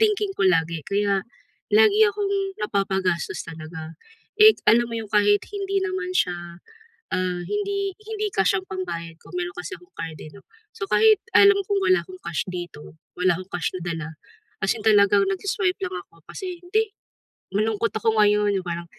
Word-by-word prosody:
thinking 420 Hz, -2 st, +2 dB
ko -, -, 0 dB
lagi, 165 Hz, -3 st, +1 dB
kaya, 200 Hz, -1 st, +1 dB, 0.5 s
lagi 430 Hz, 0 st, +5 dB
akong 405 Hz, -2 st, -1 dB, 0.3 s
napapagastos 190 Hz, -4 st, -1 dB
talaga. 160 Hz, 0 st, -8 dB, 0.5 s
Eh, 435 Hz, 0 st, +9 dB
alam 235 Hz, +1 st, +5 dB
mo 230 Hz, -, -4 dB
'yong 215 Hz, -2 st, -7 dB
kahit 205 Hz, 0 st, +4 dB
hindi 395 Hz, -1 st, -1 dB
naman 375 Hz, -1 st, -3 dB
siya, 175 Hz, -, -1 dB, 0.5 s
ah, 185 Hz, -1 st, -1 dB
hindi 400 Hz, -1 st, -2 dB
hindi 430 Hz, -1 st, -3 dB
cash 195 Hz, 0 st, +3 dB
ang 190 Hz, -, -9 dB
pambayad 170 Hz, -3 st, -5 dB
ko, -, -, -16 dB
meron 355 Hz, +1 st, -3 dB
kasi 385 Hz, -, -6 dB
akong 360 Hz, +2 st, -22 dB
card 160 Hz, -1 st, -6 dB
eh 155 Hz, -, -9 dB
'no. 200 Hz, -, -14 dB, 0.3 s
So 415 Hz, -3 st, -4 dB
kahit 435 Hz, -2 st, +5 dB, 0.2 s
alam 400 Hz, 0 st, +7 dB
kong 400 Hz, +1 st, 0 dB
wala 370 Hz, 0 st, +4 dB
akong 370 Hz, 0 st, -11 dB
cash 160 Hz, -, -2 dB
dito, 175 Hz, -4 st, -8 dB, 0.2 s
wala 180 Hz, -2 st, +3 dB
akong 185 Hz, +1 st, -10 dB
cash 175 Hz, -2 st, -1 dB
na 180 Hz, -, -6 dB
dala, 165 Hz, -3 st, -4 dB, 0.6 s
as 195 Hz, -, +3 dB
in 220 Hz, -, -8 dB
talagang 205 Hz, -2 st, +5 dB
nag-si-swipe 390 Hz, -1 st, -1 dB
lang 370 Hz, 0 st, -4 dB
ako -, -, -24 dB
kasi, 365 Hz, -3 st, -6 dB
"Hindi, 430 Hz, +4 st, 0 dB, 0.7 s
malungkot 220 Hz, +1 st, +1 dB
ako 220 Hz, 0 st, +1 dB
ngayon," 210 Hz, -1 st, +3 dB
yung 180 Hz, -, -13 dB
parang, 170 Hz, 0 st, -3 dB
210 Hz, 175 wpm, -24 LUFS, -, 0.7 s, Eh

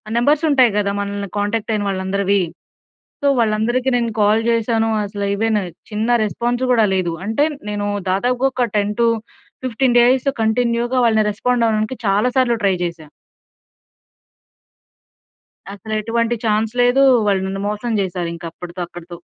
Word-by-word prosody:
Numbers 290 Hz, +6 st, +2 dB
ఉంటాయి 255 Hz, -5 st, +4 dB
కదా. 200 Hz, -1 st, +1 dB
మనల్ని 200 Hz, -1 st, -4 dB
కాంటాక్ట్ 205 Hz, +2 st, -1 dB
అయిన 210 Hz, -1 st, -1 dB
వాళ్ళందరివి. 195 Hz, +1 st, 0 dB, 0.8 s
సో 285 Hz, -, +1 dB
వాళ్ళందరికి 230 Hz, +3 st, +1 dB
నేను 235 Hz, -1 st, 0 dB
కాల్ 210 Hz, +2 st, +4 dB
చేశాను. 225 Hz, -1 st, +1 dB, 0.2 s
అసలు 200 Hz, 0 st, -5 dB
ఏవైనా, 215 Hz, -1 st, 0 dB, 0.3 s
చిన్న 215 Hz, +2 st, -2 dB, 0.2 s
రెస్పాన్స్ 240 Hz, +4 st, -2 dB
కూడా 225 Hz, -3 st, +4 dB
లేదు. 180 Hz, -3 st, 0 dB
అంటే 225 Hz, +7 st, +1 dB, 0.3 s
నేను 205 Hz, 0 st, -2 dB, 0.2 s
దాదాపుగా 245 Hz, +7 st, +1 dB
ఒక 250 Hz, -1 st, 0 dB
10-15 230 Hz, +3 st, -1 dB
డేస్ 255 Hz, +3 st, +3 dB
కంటిన్యూ‌గా 235 Hz, +2 st, 0 dB
వాళ్ళని 220 Hz, -2 st, +2 dB
రెస్పాండ్ 240 Hz, +3 st, 0 dB
అవ్వడానికి 215 Hz, +3 st, -1 dB
చాలా 200 Hz, +5 st, +2 dB
సార్లు 245 Hz, -3 st, +3 dB
ట్రై 195 Hz, -2 st, +3 dB
చేశా. 170 Hz, -2 st, -5 dB, 2.7 s
అసలెటువంటి 225 Hz, +3 st, -2 dB
చాన్స్ 215 Hz, +1 st, +1 dB
లేదు. 245 Hz, +3 st, +4 dB, 0.2 s
వాళ్ళు 195 Hz, -2 st, +2 dB
నన్ను 195 Hz, +1 st, -4 dB
మోసం 210 Hz, +3 st, -3 dB
చేసారు. 180 Hz, -2 st, -3 dB
ఇంకా 170 Hz, 0 st, -8 dB
అప్పటితో 180 Hz, +1 st, -8 dB
అక్కడితో. 175 Hz, 0 st, -10 dB
220 Hz, 130 wpm, -19 LUFS, 200-240 Hz, 2.7 s, ఉంటాయి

